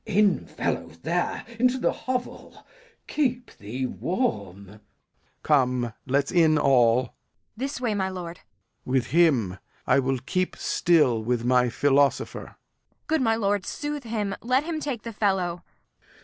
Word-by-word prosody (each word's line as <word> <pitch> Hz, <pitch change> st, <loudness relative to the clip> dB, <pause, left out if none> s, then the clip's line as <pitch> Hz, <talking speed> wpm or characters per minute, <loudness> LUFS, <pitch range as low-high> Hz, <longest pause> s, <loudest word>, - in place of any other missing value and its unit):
Glou. -, -, -4 dB
In, 205 Hz, -1 st, +3 dB
fellow, -, -, -2 dB, 0.2 s
there, -, -, -1 dB
into 250 Hz, +1 st, +3 dB
th' -, -, +1 dB
hovel; 255 Hz, -1 st, -5 dB, 0.4 s
keep 250 Hz, -4 st, -2 dB
thee 120 Hz, +6 st, -4 dB
warm. 100 Hz, -, -2 dB
Lear. 105 Hz, +3 st, -16 dB, 0.6 s
Come, 125 Hz, -5 st, +2 dB
let's 140 Hz, +1 st, +1 dB
in 160 Hz, -3 st, +4 dB
all. 125 Hz, -4 st, +4 dB
Kent. 125 Hz, -, -12 dB, 0.4 s
This 270 Hz, +2 st, -3 dB
way, 240 Hz, -4 st, 0 dB
my 190 Hz, -2 st, -1 dB
lord. 175 Hz, -2 st, -6 dB, 0.5 s
Lear. 130 Hz, -, -2 dB
With 125 Hz, -, 0 dB
him! 130 Hz, -, +3 dB, 0.3 s
I -, -, +4 dB
will 135 Hz, 0 st, 0 dB
keep 185 Hz, +9 st, -2 dB
still 150 Hz, -10 st, +2 dB
with 120 Hz, +1 st, -1 dB
my 125 Hz, 0 st, +3 dB
philosopher. 140 Hz, +3 st, +1 dB
Kent. -, -, -17 dB, 0.5 s
Good 320 Hz, -2 st, +1 dB
my 225 Hz, -3 st, +3 dB
lord, 205 Hz, -3 st, 0 dB
soothe 295 Hz, -2 st, -4 dB
him; 210 Hz, -3 st, -2 dB
let 255 Hz, +4 st, +2 dB
him 320 Hz, -1 st, -3 dB
take 275 Hz, -8 st, -4 dB
the 230 Hz, -, -6 dB
fellow. 190 Hz, -5 st, 0 dB
175 Hz, 150 wpm, -25 LUFS, -, 0.6 s, in